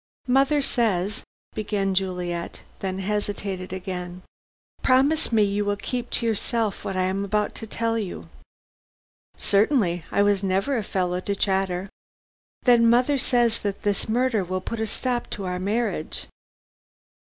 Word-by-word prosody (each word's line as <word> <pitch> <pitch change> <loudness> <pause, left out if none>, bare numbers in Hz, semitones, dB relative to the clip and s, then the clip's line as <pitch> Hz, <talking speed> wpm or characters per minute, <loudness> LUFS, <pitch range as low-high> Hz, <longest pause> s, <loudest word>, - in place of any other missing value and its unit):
"Mother 275 +3 +3
says 215 -6 0 0.2
" - - -43
began 205 -2 -1
Juliet, 180 -2 -2 0.2
then 190 -1 -3
hesitated 200 -2 -3
again. 180 -1 -5 0.6
"Promise 275 +4 +3
me 220 -2 +4
you 205 +1 +1
will 205 0 0
keep 245 +3 -4
to 235 - +1
yourself 225 -1 0
what 195 - -3
I 185 - +2
am 190 +2 0
about 210 +1 0
to 225 - -8
tell 230 +1 0
you." 200 -4 -5 1.1
"Certainly. 200 - +2
I 200 - +3 0.2
never 195 +7 +1
was 215 - -2
a - - -17
fellow 180 -1 0
to 200 +2 -2
chatter." 190 -2 0 0.8
"Then 235 -2 +6
mother 255 +4 +4
says 240 -2 +2
that 200 -1 -3
this 205 +1 0
murder 235 -2 +2
will 185 +1 -2
put 230 +4 -5
a 220 - 0
stop 245 +2 -1
to 200 - -4
our 180 0 -2
marriage." 200 -4 -1
205 Hz, 150 wpm, -25 LUFS, 185-230 Hz, 1.1 s, Then